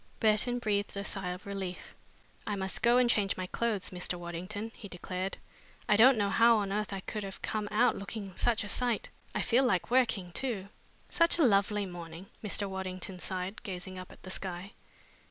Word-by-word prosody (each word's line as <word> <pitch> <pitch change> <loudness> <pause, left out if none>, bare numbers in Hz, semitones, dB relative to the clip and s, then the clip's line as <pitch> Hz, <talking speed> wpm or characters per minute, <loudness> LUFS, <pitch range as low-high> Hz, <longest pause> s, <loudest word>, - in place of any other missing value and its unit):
Burton 220 +3 +3
breathed 205 -4 -1
a 200 - -2
deep - - -8
sigh 195 -2 -3
of 180 +1 -6
relief. 195 -2 -5 0.5
"I 210 - 0
must 190 -1 -3
go 240 +1 +5
and 250 -1 +5
change 205 -4 +2
my 185 - -2
clothes, 215 0 -1
Mr. 180 0 -3
Waddington," 185 +6 -5
he 205 - -10
declared. 185 +1 -4 0.5
"I 210 - +5
don't 245 +4 +7
know 200 -1 +1
how 230 +3 +6
on 200 -2 -1
earth 210 +1 -1
I 195 -1 -3
could 215 - -4
have 195 -1 -7
come 215 -1 -1
out 230 +4 +4
looking 200 -1 -6
such 230 -3 +2
a - - -5
sight. 240 +1 +1 0.3
I - - +1
feel 245 +2 +4
like 235 -5 +1
working, 225 -8 +2
too." 205 -3 -2 0.4
"Such 335 -1 +4
a 335 - +4
lovely 205 -3 +3
morning!" 175 -1 -8 0.2
Mr. 205 -1 0
Waddington 190 -1 -4
sighed, 185 +3 -3
gazing 185 -1 -6
up 185 - -9
at - - -16
the 185 - -7
sky. 185 +1 -4
200 Hz, 195 wpm, -31 LUFS, 185-220 Hz, 0.5 s, don't